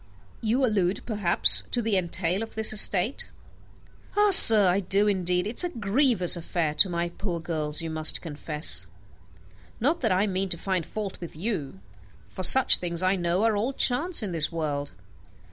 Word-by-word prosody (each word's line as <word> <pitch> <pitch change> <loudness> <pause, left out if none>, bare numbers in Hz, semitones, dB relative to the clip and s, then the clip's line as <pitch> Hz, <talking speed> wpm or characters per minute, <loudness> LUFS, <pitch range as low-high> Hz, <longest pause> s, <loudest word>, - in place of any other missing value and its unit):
"You 235 +4 -2
allude, 195 -4 -3
perhaps, 205 -7 +2
to 245 - -3
the 225 -3 -3
entail 180 +1 -3
of 225 - -9
this 220 0 +1
estate." 210 +3 +3 0.9
"Ah, 415 0 +2
sir, 220 - +10
I 180 +2 -1
do 200 +2 -1
indeed. 180 -3 -2
It 215 +4 -8
is - - +9
a 355 - -4
grievous 215 - 0
affair 170 -2 -5
to 185 - +3
my 170 0 -4
poor 175 -1 -7
girls, 155 -2 -6
you 165 - -7
must 155 0 +1
confess. 150 -1 -2 0.9
Not 295 +9 -2
that 225 -5 -2
I 185 +3 -1
mean 195 -1 -4
to 170 - -3
find 185 -1 -5
fault 205 -4 -9
with 170 - -11
you, 155 - -7 0.4
for 95 - -11
such 260 +8 +5
things, 170 0 -6
I 185 +1 0
know, 175 +2 -3
are 225 -1 -1
all 230 +7 -4
chance 280 +4 -1
in 200 - -6
this 160 -1 -1
world. 145 - -6
185 Hz, 180 wpm, -23 LUFS, 170-220 Hz, 0.9 s, sir